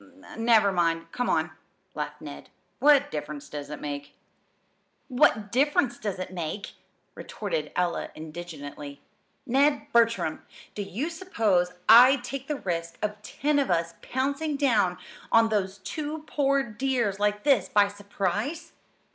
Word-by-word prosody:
"Never 225 Hz, -3 st, +4 dB
mind, 165 Hz, -2 st, 0 dB
come 245 Hz, -, -2 dB
on," -, -, +1 dB, 0.4 s
laughed -, -, -5 dB
Ned. -, -, -9 dB, 0.3 s
"What 285 Hz, -1 st, +5 dB
difference 150 Hz, -1 st, -5 dB
does 145 Hz, -1 st, -7 dB
it 150 Hz, -, -6 dB
make?" 145 Hz, -1 st, -6 dB, 0.9 s
"'What 230 Hz, -6 st, +3 dB
difference 265 Hz, -1 st, +2 dB
does 205 Hz, -3 st, -3 dB
it 185 Hz, 0 st, -6 dB
make'!" 175 Hz, +3 st, -4 dB, 0.4 s
retorted -, -, -4 dB
Ella 180 Hz, -1 st, -1 dB
indignantly. 155 Hz, -3 st, -8 dB, 0.5 s
"Ned 280 Hz, +4 st, +2 dB
Bertram, 230 Hz, -1 st, +2 dB, 0.3 s
do 210 Hz, -, -4 dB
you 235 Hz, -, -3 dB
suppose 215 Hz, -, 0 dB
I'd 245 Hz, +4 st, +8 dB
take 270 Hz, -1 st, -6 dB
the 300 Hz, -, -1 dB
risk 170 Hz, -2 st, -3 dB
of 210 Hz, 0 st, -3 dB
ten 290 Hz, +7 st, 0 dB
of 275 Hz, -, 0 dB
us 170 Hz, -1 st, 0 dB
pouncing 280 Hz, +4 st, -2 dB
down 215 Hz, -10 st, +2 dB, 0.3 s
on 225 Hz, 0 st, +5 dB
those 200 Hz, -2 st, -1 dB
two 305 Hz, -, -5 dB
poor 275 Hz, -2 st, +1 dB
dears 235 Hz, -3 st, -1 dB
like 210 Hz, 0 st, 0 dB
this 245 Hz, -10 st, +3 dB
by 205 Hz, -1 st, +4 dB
surprise? 205 Hz, -, -3 dB
210 Hz, 135 wpm, -27 LUFS, 175-270 Hz, 0.9 s, I'd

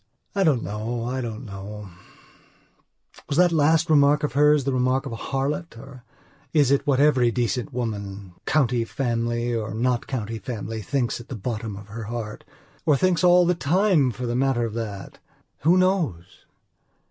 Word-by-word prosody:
I 195 Hz, -, +1 dB
don't 145 Hz, -9 st, +2 dB
know; 110 Hz, +3 st, -3 dB
I 130 Hz, +2 st, -2 dB
don't 115 Hz, +1 st, -6 dB
know; 100 Hz, 0 st, -8 dB, 1.4 s
was 140 Hz, -, -1 dB
that 180 Hz, 0 st, +5 dB
last 160 Hz, +1 st, +3 dB
remark 150 Hz, -1 st, +4 dB
of 150 Hz, -, -1 dB
hers 150 Hz, 0 st, +4 dB
the 135 Hz, 0 st, -1 dB
remark 130 Hz, +2 st, +1 dB
of 135 Hz, -, -5 dB
a -, -, -4 dB
harlot, 140 Hz, +5 st, -3 dB
or 130 Hz, 0 st, -12 dB, 0.5 s
is 145 Hz, -4 st, +4 dB
it 140 Hz, +1 st, +2 dB
what 135 Hz, -2 st, +3 dB
every 135 Hz, -5 st, +4 dB
decent 125 Hz, +3 st, -1 dB
woman, 100 Hz, -6 st, -5 dB
county 125 Hz, -6 st, +2 dB
family 120 Hz, -1 st, -1 dB
or 110 Hz, -1 st, -3 dB
not 120 Hz, +1 st, 0 dB
county 115 Hz, -4 st, -4 dB
family, 110 Hz, 0 st, -5 dB
thinks 120 Hz, +3 st, -1 dB
at 120 Hz, -, -14 dB
the 130 Hz, -, -6 dB
bottom 110 Hz, -1 st, -4 dB
of 105 Hz, 0 st, -12 dB
her 110 Hz, +1 st, -6 dB
heart? 110 Hz, -1 st, -6 dB, 0.4 s
Or 150 Hz, -3 st, +3 dB
thinks 185 Hz, +3 st, +1 dB
all 180 Hz, 0 st, +6 dB
the 180 Hz, -, +3 dB
time 170 Hz, -1 st, +2 dB
for 125 Hz, +2 st, -5 dB
the 120 Hz, 0 st, -2 dB
matter 130 Hz, -2 st, +1 dB
of 110 Hz, -, -5 dB
that? 105 Hz, -4 st, -6 dB, 0.4 s
Who 170 Hz, +4 st, +4 dB
knows? 175 Hz, -, -1 dB
125 Hz, 170 wpm, -24 LUFS, 115-145 Hz, 1.4 s, all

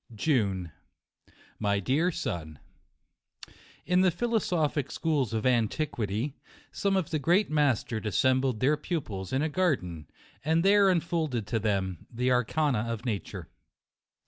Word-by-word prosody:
JUNE. 100 Hz, -, 0 dB, 0.9 s
My 100 Hz, -2 st, +1 dB
Dear 145 Hz, -, +1 dB
Son, 80 Hz, -, -4 dB, 1.3 s
In* 180 Hz, +1 st, +3 dB
the 185 Hz, -, +5 dB
philosophic 175 Hz, -, 0 dB
schools 145 Hz, -8 st, 0 dB
of 110 Hz, -1 st, -2 dB
antiquity, 120 Hz, -1 st, 0 dB, 0.4 s
some 195 Hz, -1 st, 0 dB
of 180 Hz, -2 st, -2 dB
the 155 Hz, -, 0 dB
great 175 Hz, +6 st, +2 dB
masters 130 Hz, -7 st, +1 dB
assembled 130 Hz, +3 st, +1 dB
their 145 Hz, +4 st, +3 dB
pupils 120 Hz, -, -4 dB
in 135 Hz, +3 st, +1 dB
a -, -, +1 dB
garden, 105 Hz, -, -1 dB, 0.4 s
and 160 Hz, +3 st, +2 dB
there 200 Hz, 0 st, +6 dB
unfolded 160 Hz, -, 0 dB
to 115 Hz, +2 st, -1 dB
them 95 Hz, -5 st, -2 dB
the 125 Hz, +2 st, 0 dB
arcana 125 Hz, -1 st, +1 dB
of 115 Hz, +2 st, -5 dB
nature. 105 Hz, -6 st, -4 dB
130 Hz, 125 wpm, -28 LUFS, 105-160 Hz, 1.3 s, there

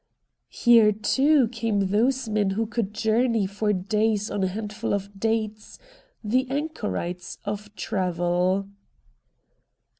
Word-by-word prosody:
Here 230 Hz, -3 st, +5 dB
too 265 Hz, +6 st, +3 dB
came 220 Hz, -4 st, -1 dB
those 245 Hz, +4 st, +1 dB
men 210 Hz, -2 st, +1 dB
who 215 Hz, +4 st, -1 dB
could 225 Hz, -2 st, -2 dB
journey 225 Hz, 0 st, +1 dB
for 205 Hz, +2 st, -1 dB
days 210 Hz, +2 st, 0 dB
on 200 Hz, -, -1 dB
a -, -, +2 dB
handful 210 Hz, +2 st, -3 dB
of 200 Hz, 0 st, -6 dB
dates, 220 Hz, -1 st, -2 dB, 0.5 s
the 250 Hz, +5 st, +1 dB
anchorites 210 Hz, -, -4 dB
of 205 Hz, +1 st, -4 dB
travel. 180 Hz, +1 st, 0 dB
210 Hz, 115 wpm, -25 LUFS, 200-230 Hz, 0.5 s, Here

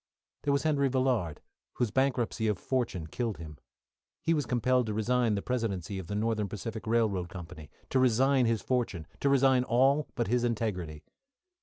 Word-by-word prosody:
There 145 Hz, -, 0 dB
was 140 Hz, 0 st, +1 dB
Henry 145 Hz, -3 st, +2 dB
Villard, 125 Hz, -, 0 dB, 0.3 s
whose 120 Hz, -4 st, -1 dB
bankruptcy 125 Hz, -2 st, +1 dB
of 105 Hz, -3 st, +1 dB
fortune 120 Hz, -8 st, -2 dB
killed 115 Hz, +6 st, -3 dB
him. 75 Hz, -3 st, -9 dB, 0.6 s
He 165 Hz, -, +2 dB
was 145 Hz, -5 st, 0 dB
compelled 125 Hz, 0 st, +2 dB
to 105 Hz, -, -2 dB
resign 115 Hz, 0 st, +2 dB
the 100 Hz, -, -3 dB
presidency 100 Hz, -6 st, -2 dB
of 90 Hz, -, -8 dB
the 100 Hz, -, -4 dB
Northern 105 Hz, -1 st, 0 dB
Pacific 110 Hz, +3 st, -6 dB
Railroad 110 Hz, -6 st, +1 dB
Company, 85 Hz, -4 st, -9 dB, 0.2 s
to 130 Hz, -, +3 dB
resign 130 Hz, +1 st, +4 dB
his 115 Hz, -2 st, 0 dB
fortune, 120 Hz, -10 st, -1 dB
to 140 Hz, -, +2 dB
resign 135 Hz, -2 st, +4 dB
all 135 Hz, +4 st, +3 dB
but 120 Hz, -, 0 dB
his 120 Hz, +3 st, +1 dB
integrity. 95 Hz, -10 st, -2 dB
115 Hz, 170 wpm, -30 LUFS, 100-130 Hz, 0.6 s, resign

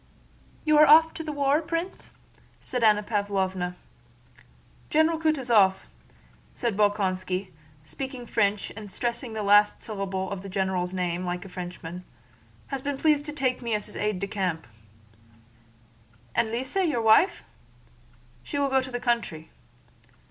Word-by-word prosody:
"You 305 Hz, -1 st, +5 dB
are 305 Hz, -, +8 dB
off 320 Hz, +2 st, +7 dB
to 320 Hz, -, -6 dB
the 310 Hz, -, -4 dB
war, 285 Hz, +1 st, +2 dB
Prince?" 335 Hz, +3 st, -4 dB, 0.5 s
said 250 Hz, -2 st, -3 dB
Anna 210 Hz, -1 st, +5 dB
Pávlovna. 190 Hz, -4 st, -1 dB, 1.1 s
"General 315 Hz, +1 st, +3 dB
Kutúzov," 240 Hz, -12 st, +3 dB, 0.7 s
said 235 Hz, -4 st, -1 dB
Bolkónski, 190 Hz, -2 st, 0 dB, 0.3 s
speaking 260 Hz, -, -6 dB
French 205 Hz, -3 st, 0 dB
and 210 Hz, -2 st, -9 dB
stressing 235 Hz, +3 st, -3 dB
the 215 Hz, -1 st, -3 dB
last 205 Hz, +1 st, +4 dB
syllable 195 Hz, -3 st, -4 dB
of 195 Hz, -2 st, -4 dB
the 195 Hz, -, -8 dB
general's 190 Hz, -2 st, -1 dB
name 180 Hz, -1 st, -2 dB
like 180 Hz, +1 st, -4 dB
a -, -, -9 dB
Frenchman, 180 Hz, -1 st, -7 dB, 0.7 s
"has 275 Hz, -1 st, -3 dB
been 285 Hz, 0 st, -3 dB
pleased 300 Hz, 0 st, +2 dB
to -, -, -3 dB
take 260 Hz, -4 st, -1 dB
me 235 Hz, -3 st, -1 dB
as 210 Hz, -, -4 dB
an -, -, -5 dB
aide 210 Hz, -2 st, 0 dB
de 200 Hz, -, -2 dB
camp...." 185 Hz, -5 st, -2 dB, 1.7 s
"And 220 Hz, -, +1 dB
Lise, 255 Hz, -, -3 dB
your 310 Hz, -11 st, +1 dB
wife?" 225 Hz, -, +4 dB, 1.0 s
"She 285 Hz, -, -5 dB
will 280 Hz, -1 st, +1 dB
go 265 Hz, 0 st, +3 dB
to 260 Hz, -, -7 dB
the 245 Hz, -, -3 dB
country." 230 Hz, -11 st, -2 dB
215 Hz, 145 wpm, -26 LUFS, 190-275 Hz, 1.7 s, are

